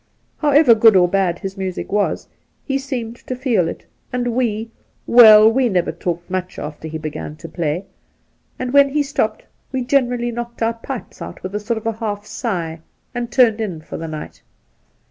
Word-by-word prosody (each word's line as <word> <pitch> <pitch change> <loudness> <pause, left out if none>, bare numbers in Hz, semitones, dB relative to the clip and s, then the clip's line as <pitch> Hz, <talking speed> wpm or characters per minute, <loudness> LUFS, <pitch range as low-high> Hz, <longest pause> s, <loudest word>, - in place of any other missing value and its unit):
However 290 -4 +6
good 225 -1 +6
or 180 -1 +6
bad 180 -2 +1
his 195 +2 -6
music 190 -2 -4
was, 205 0 0 0.4
he 270 -1 0
seemed 245 -4 -5
to 255 - -6
feel 240 - +1
it, - - -7 0.3
and 245 -1 -1
we 230 -2 -1 0.2
— - - -41
well, 220 -3 +9
we 245 +2 +3
never 180 -4 +1
talked 175 +1 -4
much 185 0 -4
after 150 +1 -6
he 160 0 -5
began 155 -1 -6
to 165 - -10
play; 170 +2 -2 0.7
and 255 0 -4
when 280 0 +6
he 295 +1 +1
stopped, 225 -6 -1 0.3
we 260 -1 -1
generally 245 -2 +1
knocked 235 0 -5
our 225 +1 +1
pipes 235 +2 -8
out - - -8
with 185 +1 -5
a 210 - -1
sort 220 +1 -3
of 225 -1 -1
half 205 -2 -3
sigh, 175 -9 -3 0.3
and 245 -1 -3
turned 230 -4 +4
in 185 -7 -3
for 155 - -8
the 165 - -5
night. 155 -1 -8
220 Hz, 185 wpm, -19 LUFS, 180-245 Hz, 0.7 s, well